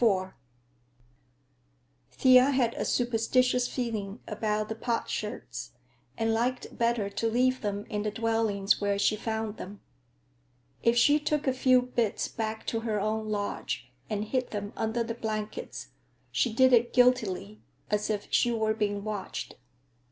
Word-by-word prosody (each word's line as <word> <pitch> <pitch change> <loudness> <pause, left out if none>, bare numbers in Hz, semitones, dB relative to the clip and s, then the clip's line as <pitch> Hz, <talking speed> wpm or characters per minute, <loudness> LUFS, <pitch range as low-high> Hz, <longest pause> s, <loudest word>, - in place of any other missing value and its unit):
IV 190 -5 +2 1.8
Thea 255 0 +6
had 255 -4 +2
a - - -3
superstitious 245 +1 +2
feeling 220 -4 -3
about 215 0 -1
the - - -1
potsherds, 210 - -4 0.4
and 225 0 +1
liked 245 +3 -1
better 230 -3 +1
to 200 +3 -1
leave 255 +2 +2
them 205 -1 -3
in 210 - -2
the 210 - -1
dwellings 220 -3 +1
where 200 -1 +1
she 210 +1 +2
found 220 0 -3
them. 200 +2 -8 1.0
If 235 +1 +3
she 290 +5 +5
took 300 0 -1
a 265 - +2
few 255 -1 +4
bits 240 -4 -1
back 220 -1 -4
to 225 - -1
her 220 -2 -1
own 215 +1 -1
lodge 135 - -3 0.2
and 210 0 -1
hid 255 +3 -1
them 205 -1 -5
under 225 +1 -1
the 230 0 -4
blankets, 215 - -5 0.4
she 130 - +1
did 260 +3 +4
it 240 0 +4
guiltily, 220 -5 +2 0.3
as 210 +1 0
if 205 -1 -1
she 240 - +3
were 220 -1 +1
being 205 -2 -1
watched. 210 -3 -5
220 Hz, 145 wpm, -29 LUFS, 205-240 Hz, 1.8 s, Thea